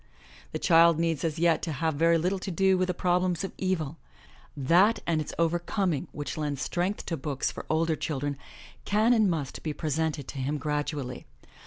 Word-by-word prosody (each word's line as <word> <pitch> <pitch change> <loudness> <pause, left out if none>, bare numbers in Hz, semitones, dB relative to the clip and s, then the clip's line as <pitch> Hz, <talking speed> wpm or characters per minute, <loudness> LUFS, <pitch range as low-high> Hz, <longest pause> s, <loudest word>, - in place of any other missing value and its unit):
The - - -2
child 165 -1 +5
needs 165 -2 0
as 165 -1 -1
yet 165 0 +3
to 160 - -3
have 160 +3 0
very 165 +3 +3
little 180 +4 0
to 195 - -5
do 190 +1 +3
with 185 0 +1
the 180 - 0
prob 180 0 +2
lems 180 -1 -1
of 195 - -5
evil. 165 -5 -1 0.6
That 175 - +4
and 165 -2 +1
its 150 - -5
overcoming 175 0 0
which 145 +1 -5
lend 145 -2 -2
strength 180 +8 -2
to 165 - -2
books 140 -1 -2
for - - -9
older 160 0 +2
children, 145 -2 -2 0.5
can 215 +4 +3
and 215 -4 +4
must 155 -6 -3
be 155 - -3
presented 155 -2 -2
to 140 - -6
him 140 +3 -1
gradually. 145 -3 -3
165 Hz, 190 wpm, -28 LUFS, 150-180 Hz, 0.6 s, child